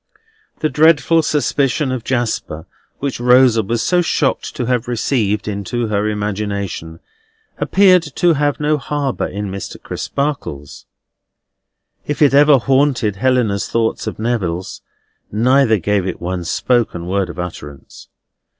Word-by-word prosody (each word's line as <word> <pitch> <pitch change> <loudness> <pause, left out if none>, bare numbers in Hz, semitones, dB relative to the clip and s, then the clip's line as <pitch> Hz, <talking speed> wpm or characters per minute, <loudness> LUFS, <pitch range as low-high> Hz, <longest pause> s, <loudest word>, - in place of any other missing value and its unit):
The 155 - +1
dreadful 160 +3 +4
suspicion 145 -2 0
of 130 -3 -3
Jasper, 115 -11 -2 0.3
which 140 -3 -4
Rosa 125 -1 +5
was 115 +3 -2
so 180 -1 +2
shocked 150 -4 -1
to 125 - -2
have 125 -1 -1
received 110 -4 -1
into 105 +3 -3
her 105 0 0
imagination, 100 -5 -4 0.6
appeared 190 -2 +4
to 175 -2 +3
have 145 -1 0
no 150 0 +1
harbour 140 -2 -2
in 100 0 -5
Mr. 100 0 -7
Crisparkle's. 75 - -5 1.2
If 145 - -3
it 140 - +4
ever 145 0 +6
haunted 130 -5 +1
Helena's 115 -5 +1
thoughts 115 -1 -1
or - - -3
Neville's, 95 -6 -3 0.5
neither 120 +1 +3
gave 100 +1 0
it 90 - -4
one 90 0 -4
spoken 115 -4 0
word 95 +1 -1
of - - -9
utterance. 75 -6 -8
120 Hz, 130 wpm, -17 LUFS, 100-140 Hz, 1.2 s, ever